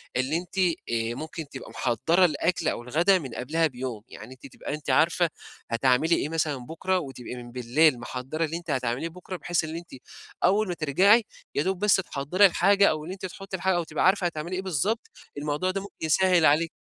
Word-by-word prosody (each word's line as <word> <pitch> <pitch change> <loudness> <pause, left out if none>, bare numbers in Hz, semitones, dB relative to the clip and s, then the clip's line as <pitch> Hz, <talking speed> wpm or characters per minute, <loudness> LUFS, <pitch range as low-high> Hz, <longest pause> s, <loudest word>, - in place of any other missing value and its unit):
اللي 130 +6 +1
أنتِ 180 +2 -8
آآ 120 -10 0
ممكن 155 0 -7
تبقي - - -9
محضّرة 160 - +2
الأكل 170 +1 0
أو 120 - -1
الغدا 170 +9 +3
من 140 -6 -7
قبلها 160 +6 +1
بيوم، 125 -5 -6
يعني 130 - -10
أنتِ 130 +1 -13
تبقي 135 - -7
أنتِ 150 0 -6
عارفة 170 +1 +3 0.4
هتعملي 130 +7 +3
إيه 150 - -2
مثلًا 155 -3 -1
بُكرة 185 +4 -1
وتبقي 135 -5 -7
من 120 -1 -9
بالليل 125 +3 +2
محضّرة 130 +7 -3
اللي 160 +2 -4
أنتِ 170 -3 -6
هتعمليه 130 +5 -1
بُكرة 180 +2 -8
بحيث 175 -1 -1
اللي 160 +1 -5
أنتِ 175 - -16 0.5
أول 205 +3 +3
ما 180 - -2
ترجعي 185 - +4 0.3
يادوب 185 +6 0
بس 210 0 +4
تحضّري 180 +2 +2
الحاجة 200 +2 +4
أو 155 -1 -2
اللي 175 +4 -6
أنتِ 190 0 -7
تُحطّي 190 +1 -6
الحاجة 185 +1 +1
أو 175 - 0
تبقي 155 -1 -1
عارفة 190 0 +3
هتعملي 170 +2 -4
إيه 185 - -2
بالضبط، 190 - -1 0.3
الموضوع 150 +5 -1
ده 195 0 -3
ممكن 200 - -11
يسهّل 180 +1 +4
عليِ 155 +3 +4
160 Hz, 195 wpm, -26 LUFS, 140-185 Hz, 0.5 s, ترجعي